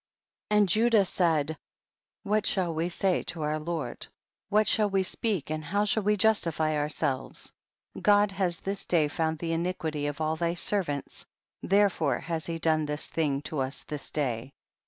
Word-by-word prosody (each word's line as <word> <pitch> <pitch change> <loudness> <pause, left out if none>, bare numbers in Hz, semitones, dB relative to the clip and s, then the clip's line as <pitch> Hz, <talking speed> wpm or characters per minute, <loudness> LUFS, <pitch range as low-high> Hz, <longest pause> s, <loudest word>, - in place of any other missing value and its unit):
31. 210 - +3
And 205 -1 +5
Judah 220 0 +4
said, 160 -4 +1 0.7
what 210 +1 +1
shall 180 -4 +1
we 165 +2 -1
say 185 +1 +1
to 165 -3 -5
our 155 +1 -1
lord, 155 -5 -4 0.4
what 210 +1 +3
shall 210 -1 +3
we 195 -1 +1
speak 190 - -2
and 155 0 -3
how 200 +7 0
shall 220 +1 +2
we 210 +1 +2
justify 165 -7 +2
our 150 0 0
selves? 145 -4 -2 0.5
God 205 -1 +4
has 185 -3 -1
this 195 0 -2
day 160 -4 +3
found 160 +1 -1
the 165 +1 -3
iniquity 165 -3 -2
of 145 0 -4
all 155 0 0
thy 170 +1 -1
servants, 175 -8 -1 0.3
therefore 195 -7 +2
has 165 -2 -3
he 165 -1 -2
done 155 -2 +1
this 150 0 -3
thing 145 -3 -1
to 150 - -4
us 135 +1 -2
this 150 -2 -5
day. 130 -3 -2
165 Hz, 175 wpm, -28 LUFS, 150-195 Hz, 0.7 s, And